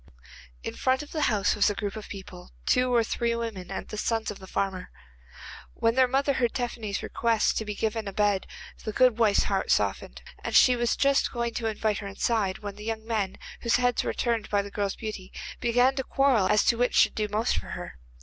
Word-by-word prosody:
In - - -4
front 260 +2 +1
of 295 - -13
the 310 - -2
house 205 -2 +2
was 210 - +3
a 205 - -2
group 205 -1 -4
of 215 - -8
people; 185 -2 -9 0.2
two 250 0 +3
or 235 -2 +4
three 235 +1 -1
women 225 -6 -5
and 195 - -5
the 215 - -6
sons 225 -1 -1
of 205 - -9
the 190 - -11
farmer. 190 -1 -2 0.9
When 230 0 +2
their 260 +1 +4
mother 275 +2 +1
heard 245 -3 0
Tephany's 230 -5 -3
request 230 -2 +1
to 220 - -4
be 210 -1 -4
given 220 0 -2
a - - -3
bed 205 -1 +1 0.4
the 215 - -4
good 250 -2 +4
wife's 215 -3 +4
heart - - -1
softened, - - 0 0.2
and - - -3
she 250 - +7
was 240 -1 +1
just 275 0 +2
going 235 -1 -2
to 230 - -2
invite 215 -1 -1
her 200 - -6
inside, 200 -1 -1
when 205 -1 -6
the 210 - -9
young 220 -1 -3
men, 215 -4 -2 0.2
whose 235 0 +2
heads 245 0 +2
were - - -1
turned 230 -3 -1
by 205 -1 +1
the 200 - -9
girl's 200 -1 -2
beauty, 210 -4 -7 0.3
began 245 +2 +3
to 265 - 0
quarrel 260 -8 +3
as 210 - +3
to 235 - +3
which 245 - +1
should - - +5
do 215 -1 -1
most 210 +2 0
for - - -10
her. 65 - -8
220 Hz, 225 wpm, -27 LUFS, 205-240 Hz, 0.9 s, she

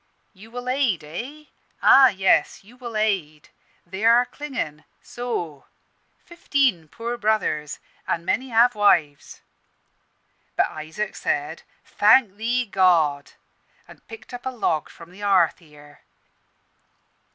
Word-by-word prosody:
'You 210 +3 -15
will 245 +1 -8
aid, 255 - 0
eh? 245 - -8 0.4
Ah, 270 -1 +8
yes, 190 -4 +1
you 225 +5 -18
will 240 -3 -7
aid. 185 -9 -2 0.4
They 190 +4 -7
are 235 +2 +5
clingin' 245 - -6 0.2
so 175 - -6 0.6
fifteen 275 - 0
poor 235 +8 -5
brothers, 210 -9 -1 0.3
and 170 - -2
many 255 +8 -1
have 240 +1 +4
wives.' 165 -9 +1 1.1
But - - +1
Isaac 160 +7 -6
said, 145 +3 -3 0.2
'Thank 210 -1 +3
Thee, 240 +3 0
God,' 170 -8 +2 0.5
and - - -17
picked 225 +1 -12
up 245 +1 -7
a - - 0
log 190 - -2
from 170 +1 -14
the 185 - -15
hearth 195 -5 +2
here. 150 -3 -18
205 Hz, 120 wpm, -23 LUFS, 160-245 Hz, 1.1 s, Ah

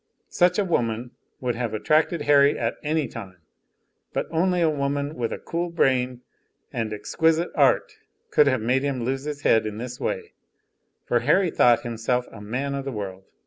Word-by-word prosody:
Such 180 0 +3
a 205 - +2
woman 120 -7 -1 0.3
would 125 -1 -1
have 120 -2 -3
attracted 155 +7 +1
Harry 145 -1 +5
at - - -2
any 155 -1 0
time, 95 -4 -9 0.8
but - - -1
only 180 +2 +1
a 170 - +3
woman 145 -1 -1
with 120 -5 -3
a - - -3
cool 175 +1 -3
brain 130 -6 +1 0.5
and 115 -2 -2
exquisite 160 +11 +1
art - - +2 0.3
could 150 - +5
have 130 -4 +2
made 125 +4 +1
him 135 -3 -2
lose 135 +3 -2
his 150 -1 -5
head 110 -1 +3
in 105 0 -5
this 125 +2 -6
way; - - -3 0.7
for 120 - +2
Harry 165 +8 +2
thought 120 -1 +4
himself 120 0 -1
a 110 - -11
man 125 +7 -3
of 140 0 -3
the 135 - -4
world. 95 -4 -6
130 Hz, 180 wpm, -24 LUFS, 115-150 Hz, 0.8 s, Harry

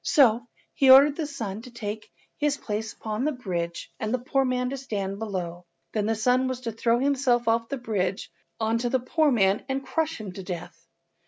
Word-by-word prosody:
So 240 -4 +4 0.3
he 270 - +3
ordered 275 +2 +9
the 315 -2 -2
son 225 -8 -5
to 250 - -11
take 215 -2 -6 0.3
his 295 -1 +1
place 215 0 -3
upon 215 +2 -4
the 305 - +2
bridge 175 - -4
and 215 -1 -2
the 255 - +2
poor 270 +2 0
man 250 0 0
to 275 - -3
stand 200 -7 -4
below. 180 -5 -4 0.3
Then 210 -1 0
the 225 - +1
son 250 +4 +2
was 255 -1 -3
to 235 -2 -3
throw 230 +1 +1
himself 255 -3 +2
off 230 0 +2
the 275 - -2
bridge 200 -6 -2 0.3
on 225 +1 +1
to 240 +1 -1
the 260 - +2
poor 305 +5 +2
man 195 -4 +3
and 270 0 -2
crush 320 -2 -1
him 210 -3 -6
to 195 - -8
death. 180 -3 -7
235 Hz, 210 wpm, -26 LUFS, 210-260 Hz, 0.3 s, ordered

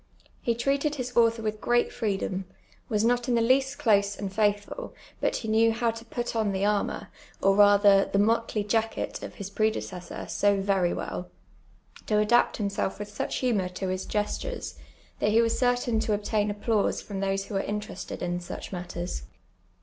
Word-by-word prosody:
He 235 - 0
treated 280 +5 0
his 250 -2 -5
author 230 -1 +3
with 215 -1 -3
great 240 0 +2
freedom, 195 -4 -2 0.4
was 215 -1 +1
not 245 +1 +1
in 240 - +3
the - - +3
least 265 +4 +2
close 205 -7 +3
and 195 -1 -5
faithful, 205 - -1 0.2
but - - +1
he 225 - -4
knew 225 +1 +4
how 230 +1 +1
to 230 0 -9
\nii 240 0 -4
on 215 -3 +1
the 190 +1 0
armour, 210 -1 0 0.3
or 195 0 +3
rather 205 -1 +6
the - - -1
motley 225 0 +2
jacket, 225 +2 -1
of - - -8
his 200 -1 -7
predecessor 215 -4 -2
so 205 -1 +2
very 195 -3 +2
well, 90 -1 -4 0.8
to 215 - +1
adaj)t 210 +3 +3
himself 200 -2 -1
witli 205 0 -7
such - - -3
humour 215 -8 +1
to 185 +1 -4
his 185 0 -3
p^estures, 210 - -3 0.4
that 210 - +2
he 220 +2 +4
was 230 -1 +2
certain 245 -2 +2
to 220 - 0
obtain 210 0 0
applause 210 0 0
from 200 -2 -6
those 195 0 -1
who 210 - -9
were 195 - +1
interested 205 -4 -5
in 175 0 -1
such 175 - -7
matters. 175 - -5
210 Hz, 180 wpm, -27 LUFS, 195-230 Hz, 0.8 s, rather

